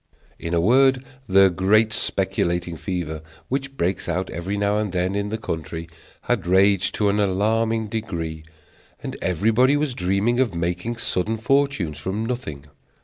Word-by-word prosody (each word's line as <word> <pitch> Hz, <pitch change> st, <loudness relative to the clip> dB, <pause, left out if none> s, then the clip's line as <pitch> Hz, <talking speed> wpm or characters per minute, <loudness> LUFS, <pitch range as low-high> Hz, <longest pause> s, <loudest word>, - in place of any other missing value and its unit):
In 85 Hz, +1 st, -2 dB
a -, -, +3 dB
word, 130 Hz, +7 st, +4 dB, 0.2 s
the 95 Hz, 0 st, +6 dB
great 105 Hz, +5 st, +3 dB
speculating 85 Hz, -4 st, 0 dB
fever 80 Hz, -3 st, -4 dB, 0.3 s
which 135 Hz, +1 st, -3 dB
breaks 90 Hz, +2 st, -1 dB
out 95 Hz, +1 st, -2 dB
every 95 Hz, +4 st, -3 dB
now 100 Hz, +1 st, +1 dB
and 105 Hz, -3 st, -2 dB
then 90 Hz, +1 st, 0 dB
in 100 Hz, 0 st, -2 dB
the 110 Hz, -, -2 dB
country 80 Hz, -4 st, -5 dB, 0.3 s
had -, -, -1 dB
raged 95 Hz, +1 st, +3 dB
to 105 Hz, -1 st, +2 dB
an 100 Hz, +1 st, +1 dB
alarming 110 Hz, +3 st, +1 dB
degree, 85 Hz, -8 st, -4 dB, 0.6 s
and -, -, -5 dB
everybody 115 Hz, -, +3 dB
was 145 Hz, -3 st, -1 dB
dreaming 100 Hz, +5 st, +1 dB
of 120 Hz, -9 st, +1 dB
making 90 Hz, +7 st, -2 dB
sudden 110 Hz, 0 st, -1 dB
fortunes 125 Hz, -, 0 dB
from 95 Hz, +8 st, -3 dB
nothing. 80 Hz, -, -5 dB
100 Hz, 150 wpm, -23 LUFS, 90-115 Hz, 0.6 s, the